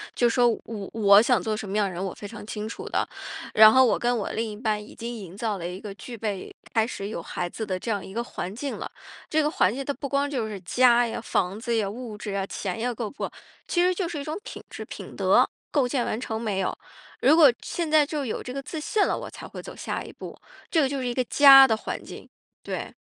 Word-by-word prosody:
就 240 - +3
是 - - -2
说， 245 -1 +5 0.2
我 210 -4 -6
我 205 -2 +7
想 235 -3 +3
做 215 +4 -1
什 215 -1 -5
么 205 - -1
样 205 -2 +2
的 185 - -6
人， 180 +3 -4
我 190 - -3
非 205 - -8
常 210 -1 -9
清 215 0 -5
楚 - - -7
的。 - - 0 0.5
然 215 0 +9
后 260 +1 +6
我 - - +2
跟 240 0 +1
我 205 - -3
另 225 0 -2
一 210 - -8
半 215 -2 -1
已 210 - -13
经 235 +1 -5
营 190 -4 -9
造 220 -3 -1
了 170 -1 -4
一 180 +2 -6
个 205 -2 -7
具 235 +1 -9
备 205 -3 -4 0.2
开 225 -1 +3
始 200 -4 -5
有 205 - -5
孩 175 0 -3
子 220 - -5
的 185 -2 -2
这 235 - -5
样 205 -3 -2
一 190 - -10
个 235 - -1
环 190 -5 -6
境 275 +4 -4
了， - - -6 0.4
这 315 - +3
个 300 - +1
环 195 - +2
境 275 - -4
它 285 - -1
不 280 - -5
光 280 0 +1
就 245 -6 -2
是 200 -2 -6
家 240 +5 +4
呀、 225 - -4
房 190 -3 -1
子 235 0 -1
呀、 205 -3 0
物 220 0 -7
质 205 - -5
呀、 195 -1 -1
钱 190 -1 -4
呀 245 +1 -1
够 220 -2 -4
不 - - -8
够， - - -7 0.4
其 350 - +2
实 365 +1 +4
就 360 -3 -1
是 305 - -4
一 280 - -4
种 310 +4 -4
品 - - -8
质、 - - -7
品 - - -9
德， - - +4 0.2
构 275 -4 +2
建 245 -2 0
完 220 - -2
成 225 -3 -4
没 205 -4 -1
有。 185 - -1 0.4
如 285 +5 +6
果 300 -6 +8
现 340 -2 -3
在 305 -1 +5
就 295 -1 -3
有 230 - -3
这 250 - -6
个 275 - -4
自 305 +3 -6
信 410 +7 +1
了， - - 0
我 - - -6
才 - - -10
会 - - -8
走 - - -10
下 - - -4
一 - - -10
步。 - - -9 0.3
这 315 -6 +3
就 275 0 -3
是 250 - -2
一 240 - -1
个 255 - +1
家 270 0 +9
的 220 - +2
环 220 - -5
境， - - -11 0.3
对。 - - -5
230 Hz, 295 characters per minute, -26 LUFS, 205-270 Hz, 0.5 s, 然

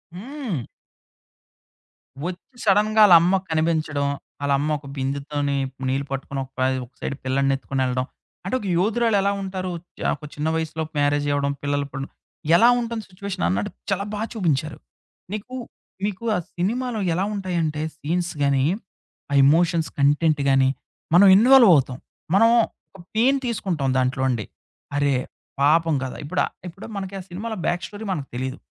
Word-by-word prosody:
హ్మ్. 225 - -5 1.6
వచ్చి 185 +8 -7
సడెన్‌గా 210 +2 +4
ఆళ్ళమ్మ 175 +1 +6
కనిపించడం. 155 -3 0 0.4
ఆళ్ళమ్మ 140 +1 +1
ఒక 140 - -18
బిందుతోని 140 +1 -2 0.3
నీళ్లు 135 +2 -1
పట్టుకొని, 135 0 -4
ఒక - - -21
పై 130 - +3 0.2
ఒక 120 - -24
సైడ్ 140 - -3
పిల్లడిని 135 +1 +2
ఎత్తుకొనిళ్ళడం, 130 -2 -1 0.4
అంటే 195 - -1
ఒక 205 - -8
యోధురాలెలా 205 0 +2
ఉంటారు. 185 -1 -4 0.3
చ - - -9 0.2
ఒక 150 - -11
చిన్న 150 +1 -2
వయసులో 160 0 -2
మ్యారేజి 145 0 +2
అవ్వడం. 140 0 0
పిల్లలు 145 0 0
ఇప్పుడు 135 0 -6 0.5
ఎలా 230 +7 +6
ఉంటుంది 230 -2 -3
సిట్యుయేషనన్నట్టు 180 - -2 0.2
చాలా 195 0 +1
బా 210 - -3
చూపించారు. 155 - -1 0.6
నీకు 215 +5 -6 0.5
మీకు 205 +1 -4
ఆ - - +1 0.2
సినిమాలో 230 +6 -1
ఎలా 180 - 0
ఉంటాయంటే 170 -6 -1
సీన్స్ 175 +3 -2
గాని, 140 -1 +3 0.7
ఆ - - 0
ఎమోషన్స్ 165 0 +3
కంటెంట్ 145 +2 +3
గాని, 135 -1 +4 0.4
మనం 195 +3 +8
ఇన్వాల్వవుతాం. 200 - +6 0.4
మనం 225 +3 +6 0.5
ఒక 180 - -12
పెయిన్ 260 +5 +4
తీసుకుంటాం 180 - -1
దాంట్లో 130 +1 0
అండి. 115 -5 -1 0.5
అరే! 145 -1 +2 0.5
పాపం 160 +3 +4
కదా! 130 - -5
ఇప్పుడు 145 - -1 0.3
ఇప్పుడు 180 +4 -10
మనకి 195 0 -5
ఆ - - -6
సినిమలో 215 +6 -5
బ్యాక్ 175 +1 0
స్టోరీ 210 +1 -8
మనకు 145 -7 -3
తెలీదు. 130 +3 -3
160 Hz, 140 wpm, -23 LUFS, 140-200 Hz, 1.6 s, మనం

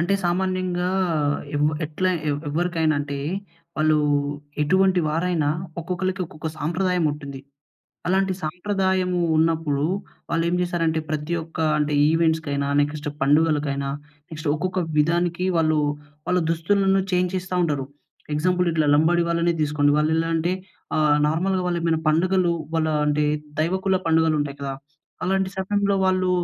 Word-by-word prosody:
అంటే 175 +4 +1
సామాన్యంగా 180 0 0 0.6
ఏవ్ 145 0 +2 0.2
ఎట్లా 185 +5 0 0.2
ఎ - - +2 0.2
ఎవరికైనా 160 -1 +1
అంటే, 140 -1 -4 0.6
వాళ్ళు 155 0 +3 0.7
ఎటువంటి 185 +3 +3
వారైనా 165 -1 0 0.3
ఒక్కొక్కళ్ళకి, 185 +3 -2
ఒక్కొక్క 155 0 -6
సంప్రదాయం 180 +3 0
ఉంటుంది. 140 -2 -8 0.7
అలాంటి 190 +1 +2
సాంప్రదాయము 185 +1 0 0.2
ఉన్నప్పుడు, 160 -3 +1 0.5
వాళ్ళేం 170 +1 +1
జేశారంటే 165 -2 0
ప్రతి 155 +2 -2
ఒక్క 160 0 -12 0.2
అంటే 150 0 0 0.2
ఈవెంట్స్‌కైనా, 160 -4 +1
నెక్స్ట్ 145 +1 -2
పండుగలకైనా, 145 -1 +2 0.4
నెక్స్ట్ 160 -1 -5
ఒక్కొక్క 185 +4 -2 0.2
విధానికి 170 +3 +1
వాళ్ళు 155 -1 +2 0.5
వాళ్ళ 180 0 +3
దుస్తులను 195 +4 +2
చేంజ్ 180 0 +1
చేస్తా 185 0 -4
ఉంటారు. 145 -4 -1 0.5
ఎగ్జాంపుల్ 180 +4 +1
ఇట్లా 155 -2 +1
లంబడి 170 +3 +3
వాళ్ళని 170 0 +2
తీసుకోండి, 145 -1 +2
వాళ్ళెలా 160 +2 +1
అంటే 170 +3 0 0.4
ఆహ్, 150 -1 +4
నార్మల్‌గా 185 +4 0
వాళ్ళేమైనా 165 -2 0
పండుగలు, 175 +2 +2 0.2
వాళ్ళ 160 -1 +1 0.2
అంటే 150 0 +2 0.4
దైవకుల 190 +4 +1
పండుగలు 160 -1 +3
ఉంటాయి 140 -1 -4
కదా! 135 -1 -3 0.5
అలాంటి 190 0 0
సమయంలో 200 +1 +1
వాళ్ళు 185 -1 +2
165 Hz, 125 wpm, -23 LUFS, 155-180 Hz, 0.7 s, ఆహ్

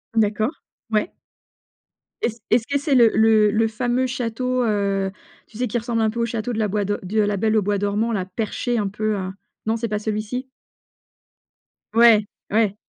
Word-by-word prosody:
D'accord, 215 +3 +2 0.4
ouais. 220 +11 0 1.1
Est-ce 230 0 -1
est 230 - +7
ce 225 - -15
que 280 - +1
c'est 285 -1 +1
le 235 -3 +7
le 220 -1 +5
le 225 +1 +2
fameux 245 +3 0
château, 250 0 -1
heu, 200 -3 0 0.4
tu 215 - -14
sais, 250 +1 0
qui 245 - -1
ressemble 230 -1 -1
un 220 - +3
peu 235 - -5
au - - +2
château 235 +1 -3
de 220 - -2
la 215 - +2
bois 205 0 -1
do 205 +1 -1
de 210 +4 -1
La 205 -1 +1
Belle 220 +2 +2
au - - +4
bois 205 +1 0
dormant, 205 +3 0
là, 195 -5 -1
perché 225 +5 -2
un 205 -3 0
peu, 215 +1 -1
heu? 185 -1 -3 0.4
Non 220 - +1
c'est 230 0 -2
pas 210 0 -2
celui-ci? 215 +4 -3 1.5
Ouais, 225 -2 +6 0.3
ouais. 215 -2 +2
220 Hz, 195 wpm, -22 LUFS, 210-235 Hz, 1.5 s, est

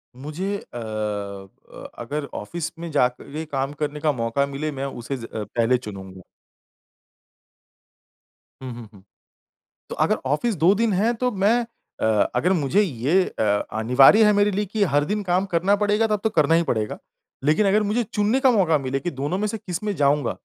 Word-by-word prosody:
मुझे 155 +10 -4 0.2
अ - - -6
अ 105 -3 -6 0.2
अगर 145 +5 -4
ऑफिस 165 +10 -5
में 170 0 -5
जाके 140 +3 -1
काम 135 -1 -3
करने 150 0 -2
का 150 0 +2
मौका 120 +2 0
मिले 140 +2 -4
मैं 135 0 -4
उसे 135 0 -5
ज 115 - -8
अ, 110 -2 -5
पहले 115 +4 +1
चुनूँगा। 95 -5 -9 2.4
हुँ, 130 - -5
हुँ, 115 -2 -10
हुँ। 95 - -17 0.9
तो - - -5
अगर - - +2
ऑफिस 155 - 0
2 170 +5 +4
दिन 225 -1 +1
है 215 +6 +2
तो 250 +2 -1
मैं 220 +4 +2 0.4
अ 110 -2 +3
अगर 165 +9 +2
मुझे 170 +4 +2
ये 160 - +1 0.2
अ - - +2 0.4
अनिवार्य 135 - +6
है 210 - +5
मेरे 205 0 +3
लिए 205 +2 -1
कि 205 +1 0
हर 145 - +4
दिन 210 +3 -1
काम 185 +1 +1
करना 185 +2 +2
पड़ेगा 210 +2 +2
तब 210 -2 0
तो 220 - +2
करना 155 -6 +2
ही 170 - +3
पड़ेगा। 110 -9 -2 0.5
लेकिन 155 +8 +3
अगर 210 +2 +3
मुझे 215 +4 0
चुनने 215 +3 0
का 265 -1 +4
मौका 180 -9 +3
मिले 135 -1 -2
कि 175 +2 -3
दोनों 145 +7 -3
में 210 +1 -1
से 225 - -3
किसमें 195 +2 -4
जाऊँगा, 145 0 +2
155 Hz, 180 wpm, -23 LUFS, 125-205 Hz, 2.4 s, अनिवार्य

